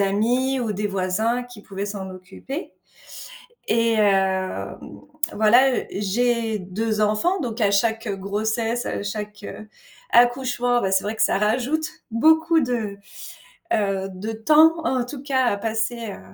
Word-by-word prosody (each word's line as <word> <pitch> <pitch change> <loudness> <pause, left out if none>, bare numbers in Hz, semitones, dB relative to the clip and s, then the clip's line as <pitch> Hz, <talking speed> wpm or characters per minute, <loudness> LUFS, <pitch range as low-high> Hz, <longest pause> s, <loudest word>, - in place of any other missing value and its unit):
amis 240 +7 +1
ou 225 -3 -1
des 210 +1 -2
voisins 205 +5 0
qui 245 -3 -13
pouvaient 195 0 -5
s'en 200 -2 -5
occuper, 190 - -8 1.0
et 230 0 +2
hem, 190 - +1 0.5
voilà, 240 +5 +5 0.2
j'ai 225 +2 0
2 215 +4 -2
enfants, 215 - +1
donc 235 -3 -4
à 200 -2 +3
chaque, 225 +3 +1
heu, 200 - -2
grossesse, 220 +4 -2
à - - -3
chaque, 210 0 -6
heu, 215 - -9 0.4
accouchement, 245 0 +3
bah, 190 - 0
c'est 190 0 +2
vrai 215 +2 -3
que - - -3
ça - - +3
rajoute 250 +9 0 0.3
beaucoup 320 +7 +4
de, 230 -6 -2 0.8
heu, 195 -2 0
de 210 +5 -5
temps, 305 +9 +5
en 255 -2 0
tout 265 +1 -8
cas, 260 -3 +1
à 200 - +1
passer, 225 +1 -2
heu, - - -11
220 Hz, 145 wpm, -23 LUFS, 200-245 Hz, 1.0 s, voilà